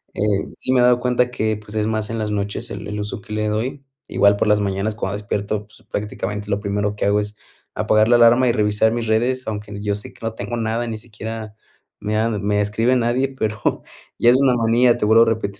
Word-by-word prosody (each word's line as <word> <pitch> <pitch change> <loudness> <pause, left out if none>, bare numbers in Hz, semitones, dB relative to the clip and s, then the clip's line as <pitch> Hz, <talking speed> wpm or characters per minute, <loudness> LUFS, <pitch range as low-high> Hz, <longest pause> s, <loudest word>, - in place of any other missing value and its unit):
Eh, 105 -1 0
sí 130 - -3
me 130 - +4
he - - +5
dado 125 0 +5
cuenta 125 0 +1
que 110 -3 -1
pues 105 0 -12
es 110 0 0
más 110 -1 -2
en 115 - -3
las 105 -1 -2
noches 105 +3 -3
el 100 0 -6
el 105 0 -4
uso 105 +3 -4
que 110 -3 -9
le 105 0 -1
doy 115 +6 -2 0.2
igual 100 0 +3
por - - +1
las 105 0 +4
mañanas 100 +2 -1
cuando 100 -2 -3
despierto, 105 0 -3
pues 110 - -19
prácticamente 105 0 -4
lo 100 - +1
primero 105 0 -1
que - - -2
hago 100 +1 +3
es 105 +1 -5 0.4
apagar 110 0 +3
la 120 - +6
alarma 120 +2 +6
y - - +5
revisar 105 0 +2
mis 115 -1 -2
redes, 125 +4 0
aunque 105 -1 -5
yo 105 -1 -1
sé 105 - -9
que - - -21
no 115 - -2
tengo 120 +1 -4
nada, 115 +1 -1
ni 110 - -4
siquiera 110 -1 -7 0.4
me 105 +1 -2
han 110 -2 0
me 105 0 +1
escribe 115 +5 +1
nadie, 125 +2 +1
pero 110 -5 -2 0.4
ya 120 - +5
es 120 - +6
una 135 -2 +4
manía. 120 +1 +3
Te 115 - 0
vuelvo 110 +2 +6
a - - +3
repetir. 110 -3 -1
110 Hz, 240 wpm, -21 LUFS, 105-115 Hz, 0.4 s, la